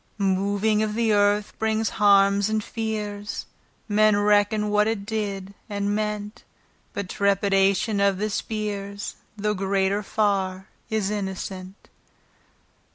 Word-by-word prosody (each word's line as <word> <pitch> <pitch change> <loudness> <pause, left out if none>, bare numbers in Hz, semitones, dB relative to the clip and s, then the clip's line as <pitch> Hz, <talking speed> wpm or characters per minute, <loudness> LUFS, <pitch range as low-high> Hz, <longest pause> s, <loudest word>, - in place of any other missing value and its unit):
Moving 200 +2 +1
of 215 -1 -1
th' 230 -1 +2
earth 205 0 +2
brings 220 0 0
harmes 200 0 +5
and 215 -1 0
feares, 210 -2 -4 0.4
Men 215 -1 +4
reckon 210 +1 +3
what 210 0 +3
it 220 -3 -2
did 200 -3 -3 0.2
and 205 0 -1
meant, 210 0 -3 0.5
But 200 -2 -3
trepidation 200 +1 +2
of 200 -1 +3
the 210 +2 -2
speares, 205 -2 -4 0.2
Though 210 +1 0
greater 195 +1 0
farre, 195 -2 -1 0.2
is 215 -2 0
innocent. 190 -1 -5
205 Hz, 115 wpm, -24 LUFS, 200-215 Hz, 0.5 s, harmes